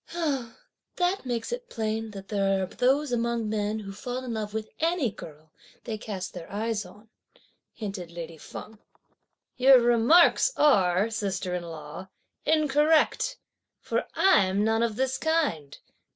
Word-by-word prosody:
"That 360 -2 0
makes 235 - -2
it 485 0 -5
plain 220 0 -2
that 195 -2 -10
there 195 -2 +1
are - - 0
those 265 +8 +1
among 235 -1 0
men 210 0 -1
who 200 -2 -7
fall 250 +5 -5
in 240 - -4
love 215 -2 -3
with 220 0 -4
any 325 - +1
girl 155 -5 -12 0.3
they 220 -2 -5
cast 195 -4 -5
their 175 -2 -9
eyes 215 -1 -2
on," 210 +4 -17 0.6
hinted 195 -6 -6
lady 170 -1 -8
Feng. 215 +7 -10 0.8
"Your 260 0 +7
remarks 240 - +5
are, 200 -7 +3
sister 190 -4 -2
in 180 - -2
law, 160 +2 -8 0.4
incorrect, 305 0 +2 0.4
for - - -2
I'm 200 - +4
none 225 +1 +2
of 230 -2 0
this 260 +2 -1
kind!" 290 - 0
220 Hz, 140 wpm, -27 LUFS, 195-255 Hz, 0.8 s, Your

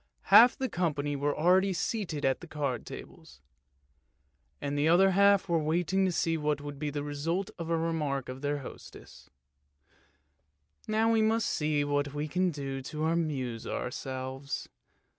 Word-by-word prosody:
Half 240 +1 +9
the 265 - -1
company 150 - -1
were 145 +1 -1
already 185 +4 +3
seated 170 -4 -2
at 135 0 +1
the 175 - -9
card 140 -7 -3
tables, 65 - -11 1.2
and 140 0 -3
the 145 +2 +2
other 185 +4 +5
half 200 0 +4
were 170 -2 +2
waiting 175 +5 +1
to 185 - +1
see 165 -1 0
what 150 -1 0
would 145 -1 -8
be 150 0 -2
the 145 0 -4
result 165 +8 -2
of 165 -1 -5
a 165 - +2
remark 155 -5 -1
of 130 +1 -7
their 145 0 -1
hostess 130 - -12 0.5
— 75 0 -38
" 75 +1 -47 0.3
Now 220 +1 +2
we 225 -1 +3
must 220 0 +2
see 150 -1 0
what 145 0 -1
we 150 +1 -2
can 180 +4 +1
do 135 -4 -5
to 155 +3 -4
amuse 145 -8 -1
ourselves." 130 +2 -4
150 Hz, 165 wpm, -30 LUFS, 140-175 Hz, 1.2 s, Half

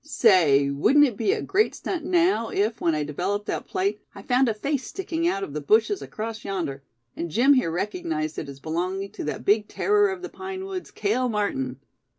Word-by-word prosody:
Say, 170 - +4
wouldn't 275 - +5
it 245 -6 -2
be 210 -1 +1
a - - -1
great 400 +3 +1
stunt 345 -5 -4
now, 345 - +2
if, 215 +3 -1
when 165 -2 +2
I 150 - 0
developed 185 +8 -2
that - - -3
plate, 390 +1 -1
I - - -10
found 255 0 +3
a - - +1
face 275 +4 -2
sticking 340 -3 -2
out 195 - 0
of 145 - -6
the 150 - -3
bushes 220 - +2
across 220 0 -6
yonder; 170 -9 -3 0.3
and 170 - -4
Jim 250 - +5
here 255 -11 +2
recognized 165 -4 -3
it 145 - -6
as 140 -1 -10
belonging 185 +6 -3
to - - -7
that 150 - -4
big 210 +1 +3
terror 415 0 +2
of 380 -1 -5
the 370 - -5
pine 380 0 -6
woods, 380 -2 -6
Cale 240 +5 0
Martin!" 135 - -2
215 Hz, 205 wpm, -25 LUFS, -, 0.3 s, wouldn't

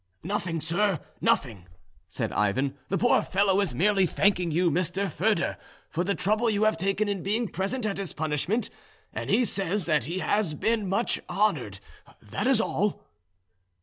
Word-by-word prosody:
"Nothing, 175 -2 -2
sir, 175 +2 +1 0.2
nothing," 105 -10 0 0.4
said - - -2
Ivan. 130 +7 0
"The 195 - +1
poor 245 - +3
fellow 195 0 +2
is 180 -11 0
merely 195 +4 +3
thanking 180 -1 +2
you, 170 +2 +2
Mr. 180 +4 0
Foedor, 165 - 0 0.3
for 175 - -1
the 200 +2 0
trouble 215 +4 +1
you 210 -1 +1
have 215 -3 +3
taken 195 +5 0
in 200 -3 -2
being 215 +5 0
present 210 +6 -2
at 200 -2 -2
his 195 -3 -3
punishment, 155 - -1 0.4
and - - -5
he 250 - +4
says 195 -2 0
that 150 -7 +1
he 170 +5 -3
has 190 -4 0
been 220 +2 0
much 200 +5 +1
honoured, 175 - 0 0.4
that - - -3
is - - +4
all." - - -1
190 Hz, 165 wpm, -27 LUFS, 165-205 Hz, 0.4 s, he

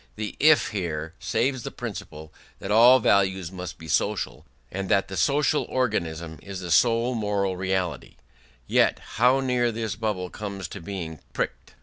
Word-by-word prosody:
The 110 -1 -5
"if" 155 +1 +5
here 80 -6 -3
saves 130 -2 0
the - - -5
principle 75 +1 -8 0.2
that 100 - -5
all 120 +4 +8
values 95 -6 +2
must 90 -3 -7
be 80 - -11
social, - - -1 0.2
and 95 0 -4
that 100 -1 +2
the 95 - -5
social 150 +6 +2
organism 85 -10 -2
is 100 -2 -7
the 90 -2 -5
sole 115 +7 +3
moral 100 -4 -1
reality: 95 -2 -2 0.5
yet - - +3 0.2
how 125 +4 +4
near 125 -2 +1
this 110 -2 -3
bubble 105 -4 -3
comes 100 -3 -5
to 100 - -8
being 85 -4 -6
pricked! - - -4
100 Hz, 155 wpm, -25 LUFS, 90-115 Hz, 0.5 s, all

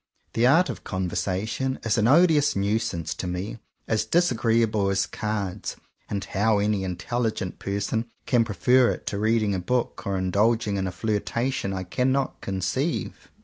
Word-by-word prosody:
The 115 +2 +3
art 165 +7 +5
of - - -10
conversation 95 +7 -2
is 115 -3 +1
an 110 - +3
odious 150 0 +5
nuisance 100 -5 -1
to 90 - -5
me, 90 +6 -4
— - - -45
as 110 -1 +1
disagreeable 115 - +2
as 95 -2 +1
cards; 105 -1 -3 0.2
— - - -40
and 100 -2 -2
how 105 +2 +2
any 100 -1 +1
intelligent 100 +1 -2
person 100 +4 -2 0.2
can 120 -3 +3
prefer 125 +3 +3
it - - -4
to 100 - -2
reading 110 -1 +2
a 95 - -1
book, 120 +7 -1
or 100 -1 0
indulging 105 +3 +1
in 95 -1 -1
a - - -3
flirtation, 110 +3 -1
I 95 -1 -3
cannot 130 +8 0
conceive. 100 - -2
105 Hz, 160 wpm, -25 LUFS, 95-120 Hz, 0.2 s, art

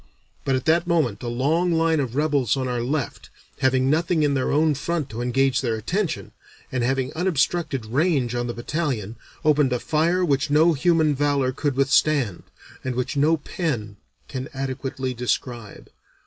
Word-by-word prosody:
But 135 - +2
at 130 - -2
that 170 +2 +3
moment 150 - +1
a 120 - -5
long 150 +9 +1
line 165 -1 +2
of 130 -3 -2
rebels 140 -5 +1
on 130 -1 -1
our 125 -1 -1
left, 135 +2 -3 0.3
having 130 0 +2
nothing 160 +2 +2
in 145 -1 +2
their 130 -2 0
own 155 +1 +3
front 150 0 -3
to 115 +2 -5
engage 135 +2 +1
their 120 -4 0
attention, 175 - -2 0.4
and 130 -2 -1
having 130 +1 0
unobstructed 160 -6 0
range 135 0 +1
on 120 0 -1
the 120 - -3
battalion, 120 - -3 0.3
opened 150 -3 +4
a 125 - 0
fire 170 +6 +1
which 140 -2 +1
no 160 +3 +5
human 160 0 +3
valor 140 -2 +1
could 140 +1 -2
withstand, 140 - +2 0.4
and 130 -1 -3
which 125 +4 -2
no 155 +3 +3
pen 125 - -3 0.3
can 130 +1 -5
adequately 130 -1 -3
describe. 120 -2 -4
135 Hz, 165 wpm, -23 LUFS, 125-155 Hz, 0.4 s, no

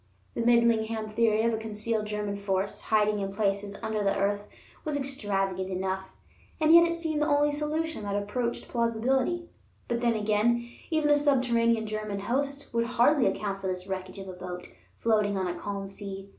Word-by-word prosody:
The - - -2
Midlingham 230 -2 +3
theory 220 0 +2
of 230 0 +2
a - - 0
concealed 215 0 -2
German 210 -1 -2
force, 200 0 -2
hiding 210 -1 +2
in 195 -1 -2
places 200 0 -1
under 220 -1 -1
the 195 0 +1
earth, 205 +1 0 0.4
was 300 -2 -1
extravagant 195 -9 -1
enough, 190 0 -2 0.5
and 315 0 +5
yet 340 0 +8
it 335 - -1
seemed 320 -3 -2
the 300 - +2
only 290 0 +3
solution 305 0 -2
that 200 -1 -3
approached 235 +4 -2
plausibility; 255 +8 0 0.4
but 235 0 -1
then 235 -1 +2
again 220 +3 +1 0.2
even 310 -3 +2
a - - +7
subterranean 235 -6 +2
German 215 -2 -3
host 280 +5 -2
would 230 0 +1
hardly 250 +3 +4
account 195 -2 -2
for 190 - -3
this 180 -1 -3
wreckage 190 0 -5
of 195 -1 -7
a 185 - -6
boat, 180 0 -7 0.3
floating 210 -3 +2
on 190 - 0
a 175 - -1
calm 195 +2 -5
sea. 195 0 -7
220 Hz, 180 wpm, -28 LUFS, 200-250 Hz, 0.5 s, yet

